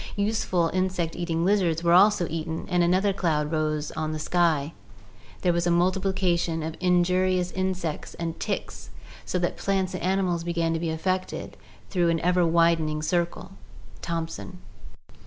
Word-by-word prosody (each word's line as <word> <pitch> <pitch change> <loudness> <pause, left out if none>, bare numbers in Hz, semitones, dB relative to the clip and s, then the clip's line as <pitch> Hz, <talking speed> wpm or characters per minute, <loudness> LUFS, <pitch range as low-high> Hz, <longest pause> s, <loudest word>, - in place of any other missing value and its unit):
Useful 200 -5 0
insect 185 -3 -1
eating 170 -1 -1
lizards 180 -5 +2
were 170 0 +4
also 200 0 +5
eaten, 160 +1 -4
and 180 -1 +2
another 185 +3 +2
cloud 155 -5 0
rose 155 -1 -1
on 155 0 -3
the - - -3
sky 160 -2 +1 0.3
— 105 +1 -24
there 180 -2 +3
was 170 0 0
a - - +3
multiplication 175 -2 +1
of 160 0 -4
injurious 180 0 +2
insects 185 -4 -3
and 165 -1 -4
ticks, - - -4 0.4
so - - -1
that 175 -1 -1
plants 190 -2 -1
and 185 - -4
animals 185 -2 0
began 170 -1 0
to 165 - -1
be 165 0 -2
affected 185 +4 -2 0.4
through 175 -3 +2
an 165 -1 +1
ever 180 0 +3
widening 165 -2 +2
circle" 175 +3 -1 0.5
(Thomson). 170 +2 -4
175 Hz, 155 wpm, -26 LUFS, 165-185 Hz, 0.5 s, also